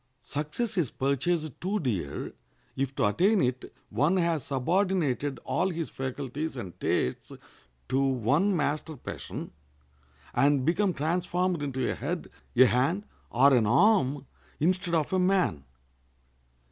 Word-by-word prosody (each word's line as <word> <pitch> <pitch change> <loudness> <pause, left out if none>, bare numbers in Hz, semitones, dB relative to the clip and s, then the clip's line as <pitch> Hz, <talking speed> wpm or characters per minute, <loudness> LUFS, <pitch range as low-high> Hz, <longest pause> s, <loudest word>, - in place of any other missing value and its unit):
Success 180 +9 -2
is 155 -8 +1
purchased 140 +3 -1
too 200 +4 0
dear 100 - -3 0.4
if 135 0 -2
to - - +2
attain 185 - +3
it 125 -4 -1 0.2
one 170 +6 +2
has 170 -5 +1
subordinated 145 - 0
all 185 - 0
his 165 -3 -4
faculties 135 +3 -4
and 95 -8 -7
tastes 65 - -1 0.6
to 130 +2 +1
one 135 - +2
master 150 +1 -2
passion, - - -7 0.8
and 140 +1 +3
become 185 +5 +2
transformed 175 +2 0
into 130 -3 -2
a - - 0
head, 160 +6 -4 0.2
a 130 +2 +8
hand, 135 - +1 0.2
or 135 +3 +5
an 115 -4 +4
arm, 145 - +3 0.3
instead 175 +2 +1
of 160 +2 0
a 185 - +3
man. 180 - +1
145 Hz, 130 wpm, -28 LUFS, 130-180 Hz, 0.8 s, a